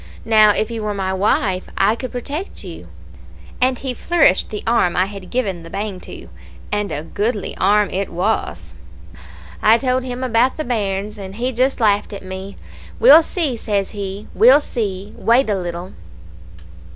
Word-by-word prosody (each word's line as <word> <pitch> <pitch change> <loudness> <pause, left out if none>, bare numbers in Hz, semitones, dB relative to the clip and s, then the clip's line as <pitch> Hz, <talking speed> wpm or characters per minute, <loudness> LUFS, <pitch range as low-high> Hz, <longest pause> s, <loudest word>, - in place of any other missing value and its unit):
Now, 215 -1 +6
if 215 +2 +1
you 225 -1 -4
were 210 -1 -2
my 190 -1 -2
wife, 190 -1 0
I 215 - +3
could 255 +2 -6
protect 285 - -6
you;' - - -9 0.7
and 255 0 +2
he 260 0 -3
flourished 300 - +2
the 210 - -5
arm 225 -7 +2
I 185 - +3
had 195 -2 -9
given 195 -9 -2
the 165 - -11
bang 200 0 -4
to - - -11 0.4
and 210 -1 -1
a 150 - -4
goodly 205 +5 -2
arm 205 +2 +3
it 195 +1 -2
was. 190 +6 -2 0.9
"I 220 +2 +6
told 255 +1 0
him 250 0 -5
about 250 +1 +2
the 310 - -2
bairns, 210 -3 -2
and 190 0 -8
he 245 +3 -2
just 260 +3 0
laughed 210 -2 +1
at 195 -1 -8
me. 190 +1 -7 0.4
'We'll 465 -8 +8
see,' 315 -7 -1
says 200 -3 -2
he. 200 0 -6
'We'll 255 +5 +6
see. 205 -6 -4
Wait 230 +3 +3
a - - +1
little.' 175 0 -5
210 Hz, 170 wpm, -19 LUFS, 195-245 Hz, 0.9 s, We'll